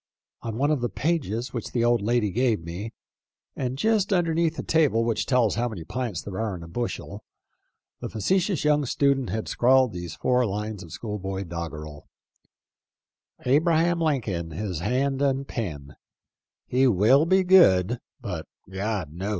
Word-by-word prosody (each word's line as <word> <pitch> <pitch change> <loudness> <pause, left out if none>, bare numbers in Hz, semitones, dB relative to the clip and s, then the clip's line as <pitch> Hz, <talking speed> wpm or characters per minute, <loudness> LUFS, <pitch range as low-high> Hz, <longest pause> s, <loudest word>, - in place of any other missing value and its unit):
On 115 -2 -5
one 145 +4 +2
of 150 -5 0
the 120 - 0
pages 130 - -2
which 120 - -5
the 120 -1 +2
old 120 -2 +3
lady 110 -1 +1
gave 120 0 +1
me, 90 +7 -6 0.6
and 130 0 -3
just 215 +3 +1
underneath 165 -3 +1
the - - -5
table 145 -8 +2
which 115 -1 -1
tells 125 -5 +3
how 120 +2 -1
many 100 -7 -7
pints 115 0 -4
there 100 -1 -6
are 110 -4 -2
in 85 - -9
a - - -9
bushel, 105 +1 -5 0.8
the - - -5
facetious 185 - 0
young 150 -1 +3
student 140 -1 +1
had 110 0 -3
scrawled 130 -1 +3
these 85 -3 -6
four 125 0 +2
lines 105 0 -4
of 85 -4 -11
schoolboy 95 -1 -4
doggerel: 80 -4 -7 0.7
" - - -32
Abraham 165 +5 +3
Lincoln, 110 - -1
His 90 +1 -4
hand 130 +8 0
and 135 -1 +1
pen, 75 - -5 0.7
He 130 +2 +3
will 125 - +4
be 190 +1 +4
good, 120 - +5 0.2
But 90 -10 -5 0.2
God 95 -3 -3
knows 85 - -11
when.'' 100 +2 -2
115 Hz, 165 wpm, -25 LUFS, 95-140 Hz, 0.8 s, good